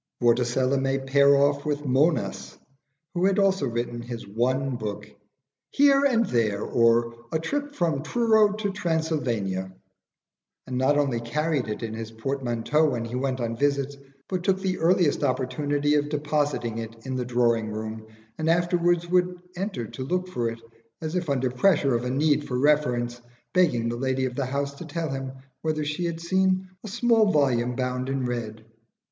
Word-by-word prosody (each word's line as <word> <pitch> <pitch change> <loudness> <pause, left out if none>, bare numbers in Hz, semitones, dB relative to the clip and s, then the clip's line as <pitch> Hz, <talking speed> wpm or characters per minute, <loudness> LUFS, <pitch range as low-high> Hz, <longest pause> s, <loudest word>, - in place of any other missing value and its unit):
Vorticella 125 +2 +2
may 135 0 +1
pair 140 +1 +4
off 140 0 +2
with 150 -1 -1
Monas, 125 - 0 0.6
who 180 0 +1
had 195 0 +2
also 195 -1 +2
written 120 0 -3
his 120 -2 -7
one 130 +5 0
book 105 -2 -5 0.6
'Here 280 0 +4
and 230 -4 +3
There; 110 - 0
or, 115 0 +3 0.2
a - - +1
Trip 290 - -3
from 160 -6 0
Truro 220 +4 +3
to 210 -1 -2
Transylvania' 145 - -1 0.9
and 125 - -4
not 140 +3 +3
only 135 -5 +1
carried 150 +3 -1
it 105 +2 -4
in 110 -1 -4
his 115 0 -5
portmanteau 130 +5 0
when 120 -4 -2
he 115 - -8
went 130 0 -1
on 115 -1 -2
visits, 140 +1 0 0.3
but 185 -2 -3
took 190 0 +2
the 190 -1 -2
earliest 170 -2 +2
opportunity 145 +3 0
of 145 0 +1
depositing 145 -6 -1
it 115 +1 -8
in 130 -1 -3
the 125 - -1
drawing 120 -2 +1
room, 110 +1 -6 0.3
and 160 +1 0
afterwards 175 0 +2
would 180 0 +1 0.2
enter 190 - -3
to 130 - -7
look 180 +6 -1
for 120 -9 -1
it, 115 0 -7 0.4
as 160 +1 -4
if 175 -4 -1
under 130 -2 0
pressure 140 -1 +3
of 120 0 0
a - - -1
need 145 +2 +1
for 125 - -2
reference, 125 -4 +1 0.3
begging 155 -11 +3
the 120 - -2
lady 130 +1 0
of 125 - -3
the 130 0 -2
house 140 +1 -2
to 140 - -9
tell 160 0 -3
him 135 -1 -4 0.3
whether 155 -1 -1
she, 150 +4 -2
had 170 -1 -3
seen 185 +2 +1
"a - - -7
small 225 -1 +3
volume 125 -5 +2
bound 125 0 -2
in 135 -1 -1
red." 110 -3 -4
140 Hz, 175 wpm, -25 LUFS, 120-165 Hz, 0.9 s, pair